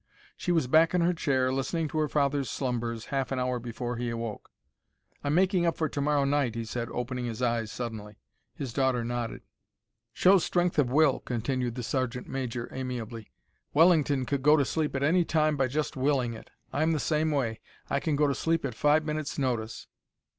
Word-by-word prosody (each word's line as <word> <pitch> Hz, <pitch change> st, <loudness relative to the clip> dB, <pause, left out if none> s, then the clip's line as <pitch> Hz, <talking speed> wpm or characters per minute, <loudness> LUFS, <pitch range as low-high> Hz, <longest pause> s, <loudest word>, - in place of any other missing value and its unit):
She 180 Hz, -, -2 dB
was 165 Hz, -5 st, +2 dB
back 160 Hz, +6 st, +4 dB
in 180 Hz, -, +3 dB
her 175 Hz, +1 st, +3 dB
chair, 130 Hz, -6 st, +1 dB
listening 155 Hz, +5 st, -1 dB
to 155 Hz, -, -2 dB
her 155 Hz, -, +2 dB
father's 140 Hz, -3 st, 0 dB
slumbers, 120 Hz, -3 st, -2 dB
half 135 Hz, -1 st, -1 dB
an 135 Hz, -, -1 dB
hour 125 Hz, -1 st, 0 dB
before 120 Hz, 0 st, -4 dB
he 120 Hz, 0 st, -2 dB
awoke. 115 Hz, -2 st, -5 dB, 0.7 s
"I'm 145 Hz, +1 st, 0 dB
making 185 Hz, 0 st, +3 dB
up 165 Hz, -, 0 dB
for 160 Hz, -, +1 dB
to 140 Hz, -, -3 dB
morrow 145 Hz, -1 st, +2 dB
night," 140 Hz, -5 st, +1 dB
he 115 Hz, 0 st, -3 dB
said, 115 Hz, +1 st, -4 dB
opening 125 Hz, 0 st, -3 dB
his 115 Hz, -1 st, -4 dB
eyes 115 Hz, -2 st, 0 dB
suddenly. 110 Hz, -4 st, -6 dB, 0.4 s
His 130 Hz, -5 st, -5 dB
daughter 130 Hz, -3 st, +1 dB
nodded. 120 Hz, -1 st, -3 dB, 0.7 s
"Shows 185 Hz, -1 st, +5 dB
strength 175 Hz, -2 st, +1 dB
of 135 Hz, -4 st, +3 dB
will," 145 Hz, 0 st, +4 dB
continued 125 Hz, 0 st, -2 dB
the 125 Hz, -, -4 dB
sergeant 125 Hz, 0 st, -2 dB
major, 125 Hz, -3 st, -3 dB
amiably. 120 Hz, -4 st, -5 dB, 0.4 s
"Wellington 150 Hz, -5 st, +4 dB
could 140 Hz, +1 st, -1 dB
go 150 Hz, +3 st, +6 dB
to 140 Hz, -, +2 dB
sleep 155 Hz, -1 st, -1 dB
at 135 Hz, -, -1 dB
any 175 Hz, +5 st, +4 dB
time 155 Hz, -2 st, +2 dB
by 135 Hz, -2 st, +1 dB
just 150 Hz, +4 st, -2 dB
willing 130 Hz, -3 st, +1 dB
it. 110 Hz, -, -11 dB, 0.2 s
I'm 160 Hz, +3 st, +2 dB
the 155 Hz, -, 0 dB
same 155 Hz, +1 st, +1 dB
way; 125 Hz, -7 st, -1 dB, 0.3 s
I -, -, 0 dB
can 155 Hz, -, 0 dB
go 150 Hz, +1 st, +3 dB
to 140 Hz, -, +2 dB
sleep 165 Hz, +2 st, 0 dB
at 130 Hz, -, -3 dB
five 150 Hz, +6 st, +3 dB
minutes' 155 Hz, -1 st, -3 dB
notice." 115 Hz, -5 st, -2 dB
135 Hz, 195 wpm, -28 LUFS, 120-155 Hz, 0.7 s, go